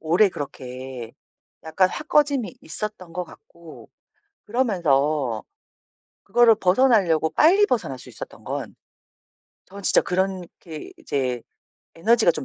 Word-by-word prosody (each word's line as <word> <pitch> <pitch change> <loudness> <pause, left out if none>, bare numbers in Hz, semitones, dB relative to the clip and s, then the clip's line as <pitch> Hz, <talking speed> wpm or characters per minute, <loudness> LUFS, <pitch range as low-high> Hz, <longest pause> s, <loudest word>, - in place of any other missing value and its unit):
오래 175 +6 +4
그렇게 130 -5 -7 0.5
약간 185 +4 +2
확 305 - -7
꺼짐이 280 -5 +2
있었던 210 -5 -6
것 180 +1 -3
같고 170 -1 -15 0.6
그러면서 155 - +1 0.8
그거를 240 -2 +5
벗어나려고 185 -7 +3
빨리 375 +7 +5
벗어날 200 - -1
수 - - -13
있었던 - - -10
건 - - -5 0.9
저는 200 +1 -11
진짜 - - +4
그렇게 180 -4 -4
이제 130 -3 -2 0.5
에너지가 220 +2 +3
좀 - - -5
180 Hz, 255 characters per minute, -23 LUFS, 150-220 Hz, 0.9 s, 그거를